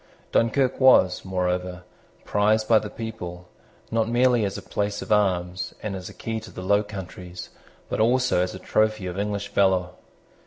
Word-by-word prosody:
Dunkirk 125 +3 +2
was, 130 -9 +5
moreover, 90 -1 -2 0.4
prized 110 +1 +2
by 110 -2 +6
the 105 - -6
people, 90 -7 -7 0.4
not 115 0 +1
merely 120 -1 +3
as 100 -1 -2
a - - -6
place 105 0 -2
of - - -9
arms, 90 -3 +1
and 105 -2 -3
as 95 -1 -7
a - - -11
key 115 -1 -4
to 110 - -11
the 90 - -8
Low 100 +2 +3
Countries, 90 -3 -8 0.4
but - - -3
also 125 -3 +3
as 90 0 -2
a - - -6
trophy 110 0 0
of 90 +1 -4
English 100 0 -2
valour. 95 -2 +2
100 Hz, 170 wpm, -24 LUFS, 90-110 Hz, 0.4 s, by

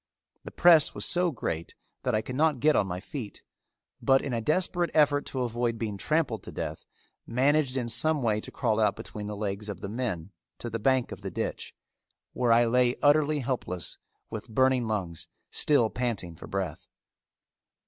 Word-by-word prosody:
The - - -7
press 170 -4 +5
was - - -1
so 180 0 +2
great 85 - -4 0.3
that - - 0
I 110 - 0
could 130 - -6
not 150 -2 +2
get 150 +4 +4
on 100 - +2
my 90 0 -4
feet, 115 - -7 0.6
but 135 0 +4
in 135 - -3
a 115 - -1
desperate 175 +5 +1
effort 145 -2 +3
to 130 -2 -2
avoid 120 -1 -1
being 110 -3 -3
trampled 150 - 0
to - - -9
death - - -5 0.4
managed 135 +2 +2
in 125 -2 -1
some 145 +5 +2
way 110 -2 +1
to - - -9
crawl 110 0 0
out 110 - +3
between 105 -1 -7
the 105 - -4
legs 105 0 -3
of 95 -4 -6
the - - -4
men 105 -7 -3 0.3
to 120 - -6
the 115 - -3
bank 130 +2 +2
of - - -8
the - - -4
ditch, - - -4 0.6
where 125 -2 +1
I 120 +1 +6
lay 125 +1 +3
utterly 150 0 +4
helpless 110 - -3 0.3
with 110 +1 -6
burning 130 +1 +2
lungs 95 -7 -3 0.2
still 140 -7 +4
panting 110 -9 -3
for - - -11
breath. 95 -1 -4
120 Hz, 185 wpm, -28 LUFS, 105-145 Hz, 0.6 s, I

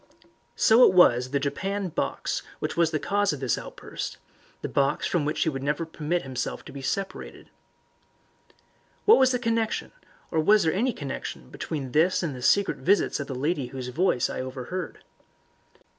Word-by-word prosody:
So 230 +3 +6
it 185 - +6
was 125 -8 +5
the 140 +1 0
japanned 190 +5 -3
box - - -2 0.2
which - - -3
was 170 -2 +3
the 155 - -1
cause 205 +3 +1
of 145 - -6
this 130 -3 +1
outburst - - -7 0.5
the - - -1
box 140 0 +1
from 165 -5 0
which 150 - 0
he 160 - +1
would 135 -3 -4
never 150 +4 -1
permit 160 +2 -2
himself 130 -2 -4
to - - -10
be 140 - -8
separated. 195 +8 -5 1.5
What 430 - +7
was 260 -1 +5
the 250 - +1
connection, 230 -2 -1 0.4
or 160 - +1
was 205 +7 +5
there 160 - +2
any 245 +7 +1
connection 135 - -6
between 140 -5 -5
this 165 +7 +3
and 150 -6 -2
the 125 - -8
secret 200 +10 +3
visits 200 -2 +2
of 140 - -4
the 135 - -5
lady 145 0 -1
whose 125 0 -6
voice 135 -2 +1
I - - -5
had 130 - -3
overheard? 130 +7 -6
160 Hz, 180 wpm, -26 LUFS, 135-195 Hz, 1.5 s, What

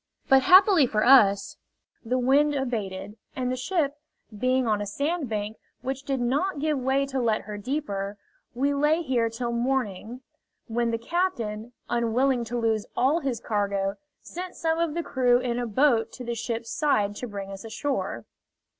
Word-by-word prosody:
But 270 0 +6
happily 370 - +6
for 215 -2 0
us 210 -7 +5 0.5
the 250 +2 0
wind 280 +4 +3
abated, 210 -6 -3 0.2
and 255 -1 -1
the - - -1
ship 290 +1 -1 0.4
being 255 +3 +1
on 210 -2 +1
a - - -2
sandbank, 225 - -2 0.3
which 265 +1 -3
did 275 -1 -2
not 285 +10 0
give 300 -1 0
way 265 +2 +1
to 270 -1 -3
let 225 -3 +1
her 210 0 -7
deeper, 205 -4 -3 0.4
we 280 +3 +1
lay 300 +4 +2
here 245 -5 +1
till 235 +1 -3
morning, 235 -2 -2 0.4
when 235 0 -1
the 230 - 0
captain, 235 - -2
unwilling 240 +2 +1
to 240 +2 -4
lose 225 -2 0
all 275 +7 +3
his 265 -7 -2
cargo, 200 -3 -1 0.3
sent 360 +1 -7
some 325 0 0
of 335 -2 0
the 340 - -1
crew 250 -4 +3
in 245 -1 -2
a 245 - -2
boat 230 -1 +2
to 255 - -8
the 235 0 -3
ship's 230 0 -4
side 210 -9 +1
to 250 - -5
bring 200 -2 -6
us 195 0 -8
ashore. 220 - -3
245 Hz, 170 wpm, -26 LUFS, 220-275 Hz, 0.5 s, But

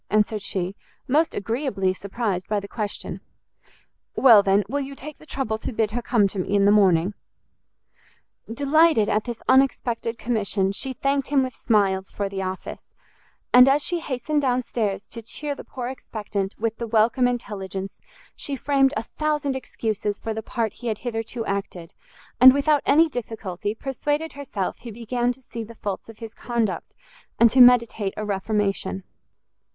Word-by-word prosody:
answered 215 0 +1
she, 190 -1 -3 0.3
most 310 +5 +2
agreeably 210 -4 -1
surprised 195 -1 -3
by 210 -1 0
the 200 - -8
question. 210 -1 -5 0.9
"Well, 230 -6 +8
then, 200 +1 +3
will 280 +6 -2
you 275 0 -5
take 300 +2 -10
the 310 - -16
trouble 220 -7 -2
to - - -4
bid 220 -2 0
her 240 +3 -2
come 230 -4 +2
to 195 - -5
me 195 +2 -1
in 200 -1 +4
the 200 - +6
morning?" 190 -2 +4 1.4
Delighted 285 -2 +3
at 215 - +1
this 240 -2 -6
unexpected 245 -3 +2
commission, 205 -5 0
she 260 +6 -3
thanked 275 +1 0
him 275 -1 +3
with 255 -1 -4
smiles 195 -4 +1
for 200 -1 -3
the 195 -1 -4
office; 185 0 -6 0.7
and 250 +2 +9
as 285 +2 +3
she 350 - -1
hastened 295 0 -1
down 255 -2 +1
stairs 210 -4 -2
to 230 - -9
chear 285 +6 -4
the - - -9
poor 250 -2 -6
expectant 210 -6 -4
with 225 0 -2
the 235 - -4
welcome 230 +3 +3
intelligence, 195 -5 -5 0.4
she 280 - -4
framed 275 +1 +2
a - - -2
thousand 295 +1 -2
excuses 215 -5 -3
for 225 - -4
the 220 - -4
part 225 0 -2
he 240 - -8
had 220 -2 -1
hitherto 225 0 -3
acted, 195 -3 -4 0.5
and 260 +1 +9
without 290 0 +3
any 320 +4 +6
difficulty, 220 - -5
persuaded 290 +5 -2
herself 235 -9 -4
he 235 - -9
began 240 +2 -1
to 260 +1 -11
see 230 -1 -6
the 230 +1 -12
faults 205 0 -5
of 225 - -11
his 225 -1 -9
conduct, 235 -5 -3 0.4
and 235 -1 +6
to 260 - +6
meditate 235 -5 +5
a 215 - -3
reformation. 195 -1 -1
230 Hz, 170 wpm, -24 LUFS, 205-265 Hz, 1.4 s, and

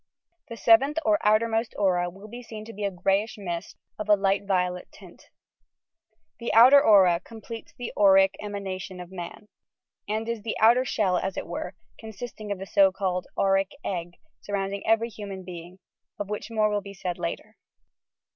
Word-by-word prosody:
The 230 - -8
seventh 265 +7 +4
or 210 -1 +3
outermost 225 +2 +2
aura 180 -3 +1
will 195 +4 -13
be 240 +3 -9
seen 220 -2 -9
to 230 - -10
be 205 - -6
a - - +1
greyish 195 +4 0
mist, 175 -4 -6 0.2
of 215 0 -5
a 210 - +7
light 195 0 0
violet 180 -2 -1
tint. - - -16 1.1
The 235 - -3
outer 260 +5 +8
aura 190 -7 +6
completes 225 +3 -10
the 245 - -6
auric 195 -1 +5
emanation 195 -2 -6
of 180 0 -9
man, 185 +3 -8 0.6
and 220 +1 -2
is 230 -2 -3
the 220 +1 -4
outer 235 +4 +5
shell, 195 -7 +1
as 190 0 -4
it - - -3
were, 175 +2 -6 0.2
constituting 220 0 -8
the 190 - -7
so 195 0 +4
called 185 -2 -2
"auric 195 0 +2 0.2
egg," 175 -2 -4 0.3
surrounding 200 0 -3
every 225 +1 +3
human 200 -3 -8
being, 175 0 -10 0.2
— - - -52
of 205 -1 -4
which 210 - -4
more 215 -2 +1
will 205 0 0
be 200 0 -10
said 180 -1 -4
later. 180 +5 -5
200 Hz, 175 wpm, -26 LUFS, 185-220 Hz, 1.1 s, outer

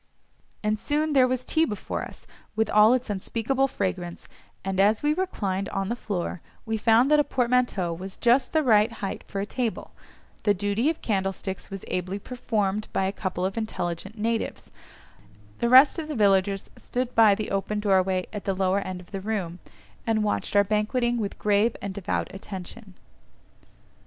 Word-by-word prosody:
And 210 0 0
soon 305 +3 0
there 260 -2 +5
was 255 0 -2
tea 320 - +2
before 210 -11 -3
us, - - -11 0.3
with 220 -1 +1
all 215 +3 +6
its 250 -3 -3
unspeakable 230 +7 0
fragrance, 185 -6 -4 0.4
and 195 0 -2
as 210 +5 +3
we 295 +1 +3
reclined 200 - -2
on 195 0 -2
the 235 - -1
floor, 185 -7 -4 0.2
we 225 -1 -1
found 230 +5 +4
that 300 - +6
a - - +5
portmanteau 245 -10 +1
was 185 +3 -8
just 245 +3 +3
the 315 -1 +2
right 220 -2 +4
height 195 -4 -5
for 195 - -4
a 200 - -1
table; 235 +1 -3 0.5
the 205 -1 +2
duty 205 +8 +1
of 325 - -4
candlesticks 195 -2 -2
was 195 -1 -7
ably 185 +2 -2
performed 215 -2 -2
by - - 0
a 190 - 0
couple 185 -2 -3
of 195 +4 -2
intelligent 195 -1 -4
natives; 225 +1 -2 0.9
the 235 - +1
rest 265 +6 +7
of 310 - -4
the 305 - -4
villagers 195 -2 +2
stood 250 0 -3
by 220 -3 +6
the 215 +1 -4
open 195 +2 -1
doorway 190 -2 +2
at 205 - -6
the 195 - 0
lower 190 +1 +1
end 185 -2 -5
of 175 - -18
the 195 -1 -4
room, 190 -4 -3 0.5
and 220 -1 +2
watched 205 0 -2
our 200 - +6
banqueting 235 +4 0
with 205 -3 -3
grave 210 +2 +2
and 200 -1 -5
devout 195 0 -2
attention. 195 +1 -9
210 Hz, 175 wpm, -26 LUFS, 195-235 Hz, 0.9 s, rest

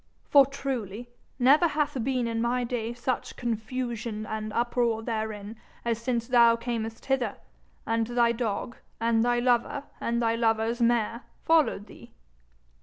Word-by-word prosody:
For 280 -2 +6
truly 245 -5 -5 0.3
never 280 +7 +5
hath 300 -2 -1
been 255 -1 0
in 225 0 -1
my 245 +1 +1
day 235 -1 -2
such 245 +1 -3
confusion 235 -1 -3
and 215 0 -4
uproar 235 -1 0
therein 220 -2 -4 0.3
as 230 -1 -1
since 235 -1 -1
thou 235 -2 +5
earnest 225 -2 -3
hither, 265 -2 0 0.5
and 225 0 0
thy 240 -1 +3
dog 235 0 -3 0.2
and 230 0 +2
thy 240 0 +2
lover 245 +3 +1 0.2
and 235 0 -1
thy 230 -1 +2
lover's 230 +1 +1
mare 235 0 +2 0.2
followed 315 -11 +3
thee.' 235 +1 -15
235 Hz, 140 wpm, -27 LUFS, 225-245 Hz, 0.5 s, For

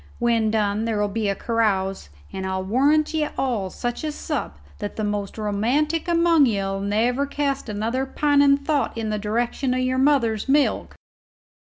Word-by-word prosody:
When 230 -2 +1
done 215 0 0
there'll 210 -2 0
be 210 0 -1
a 200 - 0
carouse, 195 - -1 0.2
and 190 - -4
I'll 190 0 -2
warrant 285 +10 +2
ye 310 -1 +1
all 230 -8 -1
such 240 - -4
a 310 - -1
sup - - -4 0.2
that 205 -1 -5
the 215 - -3
most 205 -1 -3
romantic 250 - 0
among 335 -4 +4
ye'll 195 -3 -1
never 230 +7 0
cast 280 -3 -2
another 230 +6 -2
pining 285 0 +3
thought 280 -5 -1
in 220 -1 -2
the 210 - -1
direction 235 +4 -1
o' - - 0
your 255 0 0
mother's 260 -5 +2
milk." 285 +1 +1
230 Hz, 165 wpm, -23 LUFS, 210-280 Hz, 0.2 s, among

